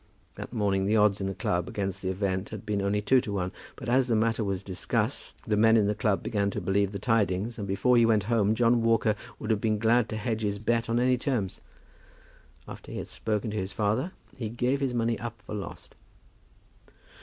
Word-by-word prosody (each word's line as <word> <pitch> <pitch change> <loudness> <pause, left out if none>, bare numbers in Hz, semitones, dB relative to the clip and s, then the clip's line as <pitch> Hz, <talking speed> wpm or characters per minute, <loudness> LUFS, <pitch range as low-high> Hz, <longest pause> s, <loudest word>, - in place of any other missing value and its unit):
That - - -8
morning 100 -4 +1
the 105 - +2
odds 105 -1 +3
in 95 - -1
the 95 - -3
club 85 0 -1
against 100 -1 -3
the 95 - -2
event 95 0 -1
had 110 -2 -8
been 105 -2 -1
only 100 +1 0
two 130 +4 +4
to 105 - -5
one. 90 -2 -1 0.2
But 130 - -9
as 130 +1 +3
the 115 - +2
matter 115 +1 +1
was 100 -2 -2
discussed, 95 -2 -2
the 105 - 0
men 110 +2 +5
in 105 - +4
the 105 - +1
club 105 -2 0
began 100 -3 0
to - - -3
believe 95 +2 +1
the 100 - -4
tidings, 110 +1 0
and 100 - -4
before 100 +6 +2
he 120 - +6
went 110 -3 +3
home, 110 -1 +2
John 120 0 +3
Walker 115 -1 +3 0.2
would 110 - -3
have 105 -2 +1
been 110 -1 +1
glad 115 +1 +3
to 110 - -3
hedge 110 +1 -2
his 100 -1 -1
bet 115 +2 0
on 115 +1 +2
any 125 0 +3
terms. 120 -9 -2 1.1
After - - -10
he - - -5
had - - -5
spoken 105 0 -2
to 105 - -3
his 95 0 -3
father, 110 - 0 0.2
he 115 -5 -4
gave 125 +4 0
his 130 -3 0
money 115 0 0
up 115 -2 -6
for 105 - -9
lost. 100 -4 -7
105 Hz, 225 wpm, -28 LUFS, 100-115 Hz, 1.1 s, he